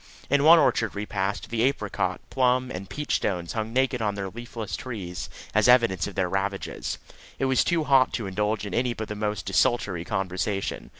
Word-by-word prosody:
In 140 0 +4
one 165 +3 +9
orchard 115 -8 +2
we 100 +1 -3
passed, 100 +1 -3
the 115 -1 0
apricot, 135 +3 0
plum, 130 0 +2
and 95 +1 -6
peach 150 0 -1
stones 90 -4 -2
hung 110 -1 -3
naked 130 0 +1
on 105 -2 0
their 100 -1 -4
leafless 115 -1 -6
trees 95 -9 -6 0.2
as 110 +1 +4
evidence 115 -8 +4
of 105 - -8
their 95 -2 +1
ravages. 95 +1 -3 0.4
It 135 - 0
was 130 -1 +3
too 170 -2 +1
hot 135 -3 +4
to 115 - -2
indulge 105 +2 -1
in 100 - -6
any 120 +1 0
but 110 0 -5
the 105 - -4
most 105 -5 -2
desultory 105 -9 +1
conversation. 95 +1 -2
110 Hz, 190 wpm, -26 LUFS, 95-125 Hz, 0.4 s, one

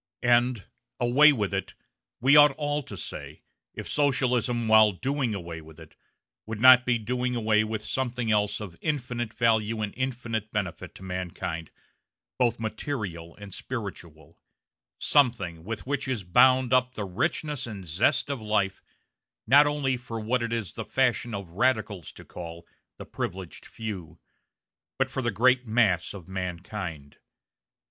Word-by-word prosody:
And 120 -3 +3 0.3
"away 140 +6 +6
with 105 -8 -1
it" 95 - -3 0.4
we 140 +4 +5
ought 145 -1 +8
all 145 +1 -2
to - - -9
say, - - -7 0.3
if - - -6
Socialism, 125 -5 +1
while 110 -1 +6
doing 130 +2 -1
away 85 -3 -6
with 80 0 -15
it, 80 -1 -14 0.5
would 110 -1 -5
not 130 +1 +8
be 120 -1 +3
doing 125 +2 -2
away 110 -2 +2
with 110 0 -4
something 125 -3 -2
else 105 -1 +1
of 95 -6 -9
infinite 125 -6 -2
value 110 -1 +1
and 105 - -4
infinite 120 -4 -3
benefit 90 -4 -4
to - - -12
mankind, 90 -3 -4 0.7
both 120 -3 +2
material 105 - -4
and 100 -2 -11
spiritual; 85 - -7 0.6
something 115 - +2
with 110 +5 -5
which 140 +1 -2
is 125 -6 -2
bound 130 +7 +4
up 125 0 +2
the 105 - -3
richness 145 - -2
and 100 -5 -7
zest 95 - +1
of 135 -5 -4
life, 105 -3 0 0.6
not 145 +5 +6
only 140 -3 0
for 120 -2 -6
what 120 +3 0
it 115 0 -2
is 115 -6 -3
the 115 - -5
fashion 120 -2 0
of 100 -4 -7
radicals 110 -4 0
to - - -13
call 85 -1 -9 0.3
"the - - -9
privileged 90 -3 -6
few," 95 -8 -7 0.8
but - - 0
for 130 - -2
the 120 - 0
great 125 +4 +3
mass 105 -6 +2
of 90 -5 -10
mankind. 90 -4 -6
110 Hz, 150 wpm, -27 LUFS, 95-125 Hz, 0.8 s, ought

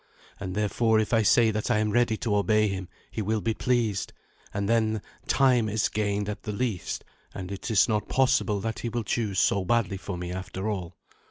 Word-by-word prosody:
And, 95 -2 -5
therefore, 110 +2 +2
if 110 +2 -1
I 115 - +5
say 110 +2 +5
that 105 0 -2
I - - +3
am 105 0 +1
ready 120 -1 +2
to 105 -2 -1
obey 105 +2 +3
him, 95 -2 -4 0.2
he 110 - -3
will 110 +2 0
be 110 +2 0
pleased; 115 -5 0 0.4
and 100 0 -2
then 110 -2 +1 0.2
time 125 -5 +3
is 105 0 +1
gained 105 -1 -1
at 105 - -4
the 105 - -4
least, 105 -3 -2 0.3
and 90 0 -6
it 100 +5 -5
is 110 -3 +4
not 105 -2 -1
possible 130 -6 +2
that 110 +1 -3
he 120 - -3
will 120 0 -2
choose 105 -1 -1
so 100 0 +3
badly 100 -1 +1
for 95 -1 -5
me 90 0 -5
after 95 +2 -5
all." 90 -5 -3
105 Hz, 205 wpm, -27 LUFS, 100-115 Hz, 0.4 s, I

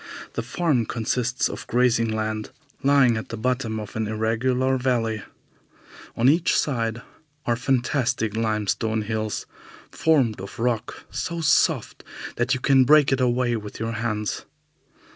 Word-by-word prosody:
The - - -2
farm 145 -10 0
consists 125 +2 0
of - - -7
grazing 120 -2 +2
land 110 0 -2 0.3
lying 135 -4 +4
at 110 - -6
the 115 - -5
bottom 120 -1 -1
of 105 -2 -8
an 110 -1 -1
irregular 120 +4 +1
valley. 115 -4 0 1.0
On 120 - +3
each 160 +5 +3
side 115 -4 -1 0.4
are 120 - +2
the 115 - -5
fantastic 125 -4 0
limestone 110 0 0
hills, 110 0 -3 0.5
formed 130 -11 +2
of 95 - -9
rock 115 -1 -2
so 170 0 -3
soft 155 - +2 0.3
that 120 +2 +1
you - - -4
can 135 0 +5
break 145 +1 +5
it 135 -1 +1
away 125 -1 +2
with 105 -2 -7
your 115 +1 -2
hands. 105 -2 -3
115 Hz, 140 wpm, -24 LUFS, 110-130 Hz, 1.0 s, can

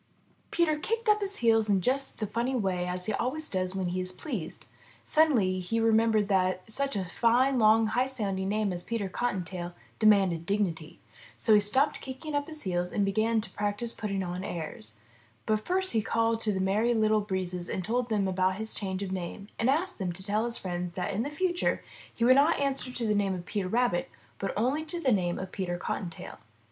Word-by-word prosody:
'' - - -36
Peter 315 -3 +1
kicked 455 +7 -2
up 420 0 +5
his 400 0 +1
heels 225 -2 +4
in 200 -2 +4
just 265 +8 0
the 215 - -2
funny 235 +5 -1
way 180 -5 -1
he 215 - 0
always 270 +9 0
does 185 0 -1
when 185 -2 -1
he 185 +1 -2
is 185 0 +2
pleased. 185 - -5 0.4
Suddenly 235 -13 +3
he 205 +6 -1
remembered 225 -2 +3
that 185 -2 +1
such 275 +1 -1
a 190 -2 -1
fine, 245 +7 +2
long, 220 0 +5
high 245 +4 +1
sounding 195 -7 -2
name 210 -2 0
as 175 - -1
Peter 220 +1 -3
Cottontail 180 -5 -3 0.2
demanded 195 -6 +4
dignity. 175 -6 -1 0.4
So 220 - +3
he 210 - +7
stopped 260 +9 +2
kicking 270 +4 -7
up 285 0 0
his 310 -1 -4
heels 180 -2 -1
and 205 - +1
began 220 +3 +1
to 220 - -8
practice 205 +3 -2
putting 200 -3 -3
on 180 +1 -4
airs. 115 - -5 0.4
But 215 -1 +1
first 375 -2 +2
he 225 - +3
called 225 +1 +1
to 220 -1 0
the 190 - -2
Merry 210 +5 +2
Little 215 -1 +3
Breezes 185 -3 -2
and 185 - -3
told 240 +2 -1
them 205 -3 +1
about 185 0 +1
his 220 +2 -1
change 190 -1 -2
of 190 - -5
name 190 +2 -5
and 230 - +2
asked 340 +5 0
them 185 -3 -1
to 190 +2 -7
tell 205 +2 +1
all 225 - 0
his 235 0 -1
friends 175 -1 -4
that 185 +2 -2
in 200 - 0
the 275 - -2
future 350 +3 0 0.3
he 230 - -1
would 255 - +7
not 290 +4 +4
answer 275 -2 -1
to 245 -2 -3
the 210 - +2
name 200 -2 +1
of 175 -1 -7
Peter 200 -2 -2
Rabbit, 230 -3 +1 0.3
but 195 - -2
only 260 +8 +1
to 315 +2 -4
the 270 -6 +2
name 180 -5 +1
of 185 0 -6
Peter 180 -3 -3
Cottontail. 175 -1 -5
210 Hz, 215 wpm, -29 LUFS, 185-245 Hz, 0.4 s, he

